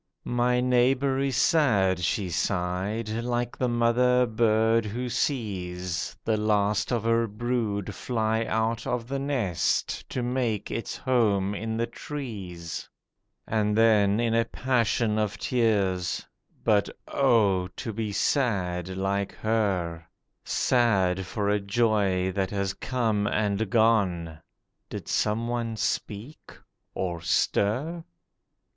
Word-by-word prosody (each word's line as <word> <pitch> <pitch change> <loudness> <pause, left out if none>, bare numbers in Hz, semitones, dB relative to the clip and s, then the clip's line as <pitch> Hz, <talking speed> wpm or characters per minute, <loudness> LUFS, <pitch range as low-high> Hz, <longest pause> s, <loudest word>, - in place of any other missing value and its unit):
'My 125 0 +1
neighbour 130 +2 +2
is 135 -2 0
sad,' 100 - +3
she 90 +2 0
sighed, 95 +5 -1
'like 120 +2 -2
the 125 - 0
mother 125 +2 +3
bird 115 0 +2
who 120 +4 -4
sees 90 - -2
The 110 -1 +2
last 105 0 +1
of 120 -3 0
her 115 0 +2
brood 110 -2 -2
fly 110 -2 -1
out 110 +1 -1
of 120 -2 -2
the 135 +1 -2
nest 130 - -1
to 125 - -3
make 120 -4 -1
its 115 - -4
home 105 -7 +1
in 110 +2 -3
the 115 - +1
trees'— 100 - -7 0.6
And 105 -1 0
then 105 -2 +4
in 115 -1 +1
a 115 0 +3
passion 115 -3 0
of 105 -2 -1
tears—'But, 100 -2 0 0.2
oh, 105 -9 +3
to 95 +4 -6
be 110 -1 -3
sad 95 - 0
like 100 +1 -1
her: 95 -7 -1 0.4
Sad 95 -7 +2
for 100 +1 -2
a 105 0 +2
joy 100 -3 +1
that 95 0 -1
has 100 -1 -1
come 110 -3 -1
and 105 0 0
gone!' 95 -8 +2 0.5
(Did - - -7
some 110 +2 0
one 120 -1 -2
speak, 105 +6 -4 0.4
or 85 -3 -3
stir?) 110 - 0
110 Hz, 120 wpm, -27 LUFS, 100-120 Hz, 0.6 s, then